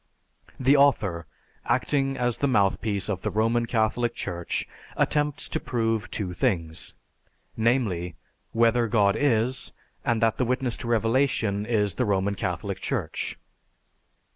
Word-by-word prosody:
The 130 +2 +4
author, 100 - +2 0.4
acting 135 -2 0
as 120 -2 0
the 140 - +1
mouthpiece 100 -4 +1
of 95 -3 -2
the - - -1
Roman 115 +2 +1
Catholic 115 +1 0
Church, 85 -1 -3 0.3
attempts 150 -1 +1
to - - -1
prove 115 -3 -1
two 95 -4 -3
things: 85 -8 -2 0.6
namely, 110 -8 0 0.4
whether 115 +1 +3
God 105 -2 +3
is, 125 -1 +1 0.3
and 115 -1 +1
that 115 0 +2
the 125 - +1
witness 125 0 0
to - - -6
Revelation 115 -3 +1
is 105 -4 +1
the 125 - 0
Roman 100 -1 +1
Catholic 100 - -3
Church. - - -3
115 Hz, 130 wpm, -26 LUFS, 100-125 Hz, 0.6 s, The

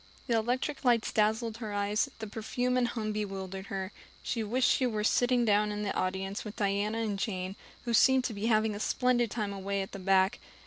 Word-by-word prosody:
The 235 - +1
electric 250 +6 -1
lights 240 -3 +3
dazzled 220 +1 +1
her 220 -3 -5
eyes, 205 +1 0
the 220 - -5
perfume 245 +4 -2
and 250 -1 +2
hum 220 -3 -3
bewildered 195 -2 -4
her. 190 0 -4 0.3
She 230 -2 -1
wished 245 +4 +2
she 255 - +3
were 215 -3 -2
sitting 245 +2 +3
down 210 0 +3
in 210 0 -3
the 200 - -2
audience 190 +2 -2
with 210 -1 -7
Diana 205 +2 0
and 205 -3 -2
Jane, 190 -2 -3 0.3
who 235 - -1
seemed 265 +3 +5
to 245 - -2
be 205 +2 -2
having 215 -1 +3
a 205 - -5
splendid 240 +1 +1
time 210 -2 -3
away 195 0 -2
at 190 - -9
the 195 - -7
back. 190 +3 +3
215 Hz, 210 wpm, -30 LUFS, 200-235 Hz, 0.3 s, seemed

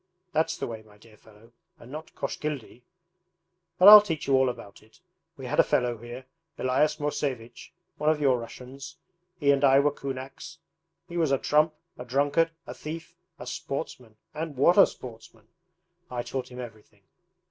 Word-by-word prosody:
That's 160 +1 0
the - - -3
way, 115 -2 -7
my 105 -1 -20
dear 110 +1 -19
fellow, 110 +2 -20 0.3
and 120 - -14
not 155 +2 -9
"Koshkildy." 140 -5 -5 1.0
But 185 - +6
I'll 210 0 +13
teach 165 -7 -4
you 135 - +1
all 130 -1 +4
about 100 -5 -9
it. 110 +1 -23 0.4
We - - -8
had - - -2
a - - +8
fellow 120 -2 0
here, 120 +3 -9 0.3
Elias 145 +4 +1
Mosevich, 135 -5 -4 0.3
one 150 - +1
of 155 -1 +2
your 135 -4 +3
Russians, 125 +3 -10 0.4
he 140 -3 +4
and 140 0 +1
I 135 0 +6
were 145 +1 +3
kunaks. 135 -1 -7 0.5
He 175 0 -6
was 160 -4 +1
a 135 - +3
trump, 150 +3 +2 0.2
a - - -5
drunkard, 145 +6 +2 0.2
a - - -7
thief, 160 +2 -8 0.2
a - - -9
sportsman 115 -4 -6 0.2
and 155 -2 -5
what 170 +7 +5
a 200 - +8
sportsman! 115 -2 -12 0.6
I 120 -1 -3
taught 130 0 -5
him 125 - -9
everything.' 110 -4 -11
135 Hz, 170 wpm, -27 LUFS, 120-150 Hz, 1.0 s, I'll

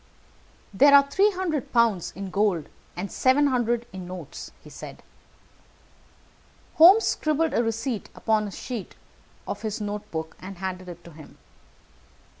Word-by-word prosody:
"There 280 +8 +7
are 280 0 +6
three 395 +7 +4
hundred 325 -8 -3
pounds 230 -7 +2
in 195 0 -6
gold, 195 -6 0 0.3
and 190 +3 -5
seven 265 +3 +3
hundred 240 -3 0
in 185 -2 -7
notes," 180 -5 -8
he - - -13
said. - - -10 1.7
Holmes 375 +7 +8
scribbled 310 +1 0
a - - +2
receipt 225 0 -3
upon 215 -2 0
a - - -7
sheet 230 0 -7 0.5
of - - -5
his 220 -1 -3
notebook, 205 -6 -5
and 190 0 -9
handed 185 0 -5
it 175 0 -10
to 170 - -13
him. 155 -1 -14
220 Hz, 140 wpm, -25 LUFS, 185-280 Hz, 1.7 s, Holmes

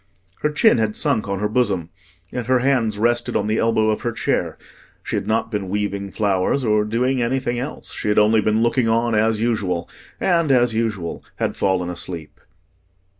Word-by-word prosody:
Her 150 - +1
chin 150 - +4
had 110 -1 0
sunk 110 - +1
on 100 0 -2
her 105 +2 0
bosom, 105 -7 0 0.4
and 120 -2 -4
her 130 0 +4
hands 125 -5 +1
rested 120 +2 +1
on 100 - +1
the 110 +1 0
elbow 110 -1 +2
of 105 - -2
her 120 - -1
chair. - - -1 0.5
She - - -3
had - - -2
not 110 +1 0
been 100 -3 -3
weaving 100 -1 -2
flowers 100 +6 0
or 105 -1 +2
doing 125 +4 0
anything 120 0 -1
else: 135 +5 -6
she - - -4
had 105 - +1
only 105 +1 +5
been 110 +2 +1
looking 120 0 +2
on 115 +1 +1
as 110 0 +2
usual, 100 -7 -1 0.3
and 170 -5 +2
as 120 -3 +3
usual 110 -7 -2
had - - -2
fallen 95 -2 0
asleep. 85 -3 -7
110 Hz, 185 wpm, -21 LUFS, 105-120 Hz, 0.5 s, only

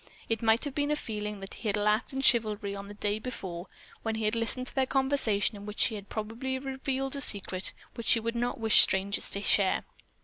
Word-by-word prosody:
It 225 -2 0
might 225 0 +3
have 285 - -4
been 290 +1 0
a 300 - +2
feeling 210 -6 0
that 195 - -8
he 225 - -6
had 205 - 0
lacked 210 +2 +1
in 270 0 -3
chivalry 215 -5 +2
on 200 0 -7
the 205 - -10
day 205 +1 -1
before, 190 -7 -6 0.3
when 225 -1 -2
he 220 -1 -2
had 210 - +1
listened 230 +2 -1
to - - -11
the 265 -1 +1
conversation 265 -7 +2
in 205 0 -9
which 210 - -7
she 230 - +4
had 205 -2 -8
probably 230 +5 -3
revealed 270 0 -3
a 280 - -3
secret 195 -5 +1 0.2
which 235 - -6
she 230 - +6
would 230 +1 -2
not 240 0 -2
wish 220 -1 +6
strangers 195 +1 +1
to 200 - -4
share. 195 -2 +2
220 Hz, 230 wpm, -29 LUFS, 205-255 Hz, 0.3 s, she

